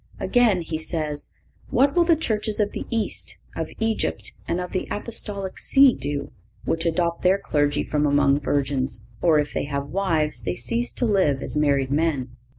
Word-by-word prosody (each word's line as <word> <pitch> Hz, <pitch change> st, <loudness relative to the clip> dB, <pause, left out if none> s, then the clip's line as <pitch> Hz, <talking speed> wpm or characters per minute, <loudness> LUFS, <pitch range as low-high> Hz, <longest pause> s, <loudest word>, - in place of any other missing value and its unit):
(524) -, -, -4 dB, 0.2 s
Again 180 Hz, -3 st, -1 dB
he 160 Hz, -1 st, -3 dB
says: 155 Hz, -3 st, -2 dB, 0.4 s
"What 275 Hz, +3 st, +3 dB
will 345 Hz, -1 st, +4 dB
the 335 Hz, -1 st, +5 dB
churches 215 Hz, -8 st, -1 dB
of 205 Hz, -1 st, +1 dB
the -, -, -6 dB
East, 225 Hz, -2 st, -2 dB, 0.2 s
of -, -, -3 dB
Egypt 225 Hz, -1 st, -1 dB
and 170 Hz, -, -1 dB
of 180 Hz, -1 st, -5 dB
the 185 Hz, -, -2 dB
Apostolic 205 Hz, -3 st, -3 dB
See 275 Hz, -2 st, +6 dB
do, 140 Hz, +1 st, -4 dB, 0.3 s
which 165 Hz, +1 st, 0 dB
adopt 170 Hz, 0 st, 0 dB
their 185 Hz, +2 st, +4 dB
clergy 145 Hz, -5 st, 0 dB
from 150 Hz, -1 st, 0 dB
among 140 Hz, 0 st, +3 dB
virgins, 135 Hz, -5 st, -1 dB, 0.2 s
or 165 Hz, -3 st, +4 dB
if 150 Hz, 0 st, -1 dB
they -, -, -1 dB
have 140 Hz, 0 st, -4 dB
wives, 160 Hz, -8 st, 0 dB
they 90 Hz, -4 st, -2 dB
cease 120 Hz, +1 st, 0 dB
to -, -, -1 dB
live 185 Hz, -, +2 dB
as -, -, -2 dB
married 140 Hz, -3 st, +1 dB
men." 145 Hz, -4 st, 0 dB
155 Hz, 180 wpm, -23 LUFS, 140-195 Hz, 0.4 s, See